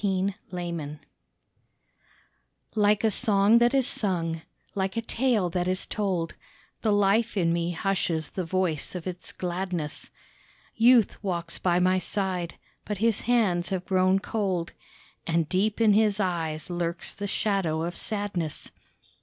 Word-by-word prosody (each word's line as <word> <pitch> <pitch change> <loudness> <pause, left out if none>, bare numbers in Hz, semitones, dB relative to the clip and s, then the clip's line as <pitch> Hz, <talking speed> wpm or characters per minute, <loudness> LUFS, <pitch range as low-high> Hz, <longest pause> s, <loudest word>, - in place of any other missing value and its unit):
A 195 0 +1
LAMENT 170 -5 -4 1.8
Like 210 -1 +3
a 220 - +4
song 205 +2 +4
that 240 +3 +3
is 265 -2 +3
sung, 165 -5 -2 0.3
like 190 +1 -2
a - - +1
tale 230 -5 +1
that 180 +1 0
is 185 +1 -1
told, 185 -6 -1 0.5
The 220 - +2
life 205 +3 +3
in 165 -3 +2
me 170 0 0
hushes 170 -4 -1
the 185 - -3
voice 175 -2 -1
of 175 - -5
its 180 -1 -6
gladness; 175 -4 -4 0.7
Youth 230 -2 +4
walks 170 -3 -3
by 175 -1 +2
my 185 +1 +3
side, 185 -2 -2 0.3
but 210 - -3
his 225 +1 +1
hands 210 -7 +2
have 185 -2 -2
grown 185 0 +3
cold, 195 -4 -1 0.6
And 165 -1 +1
deep 205 +5 +1
in 220 -2 +5
his 210 -1 +3
eyes 170 -3 -2
lurks 170 -1 -3
the 205 - -4
shadow 195 -7 0
of 170 +1 -3
sadness. 200 -7 -3
185 Hz, 140 wpm, -27 LUFS, 170-205 Hz, 1.8 s, in